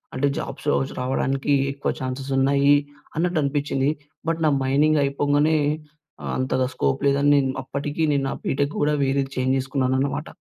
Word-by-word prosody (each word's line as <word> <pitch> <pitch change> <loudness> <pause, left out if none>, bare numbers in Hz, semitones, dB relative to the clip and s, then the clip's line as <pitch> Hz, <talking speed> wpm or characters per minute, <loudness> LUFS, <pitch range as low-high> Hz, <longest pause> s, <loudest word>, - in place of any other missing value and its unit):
అంటే 135 +2 +1
జాబ్స్ 140 +1 -6
రావచ్చు 135 -1 0
రావడానికి 135 +2 0 0.2
ఎక్కువ 140 +1 -3
ఛాన్సెస్ 130 +1 -4
ఉన్నాయి 140 +1 +4 0.4
అన్నట్టు 175 +1 +1
అనిపిచ్చింది. 140 -1 0 0.4
బట్ 165 0 0
నా 155 - +5
మైనింగ్ 145 +3 +3
అయిపొంగనే 145 +3 +2 0.8
అంతగా 130 0 0
స్కోప్ 70 - 0
లేదని 140 +1 +3
నేను 135 -2 +2
అప్పటికి 145 +4 -3
నేను 140 -1 +1
నా - - -2
బీటెక్ 140 +2 0
కూడా 150 +1 +2
వేరేది 135 0 0
చేంజ్ 130 +1 +1
చేసుకున్నాననమాట. 135 +2 -1
140 Hz, 145 wpm, -23 LUFS, 135-145 Hz, 0.8 s, నా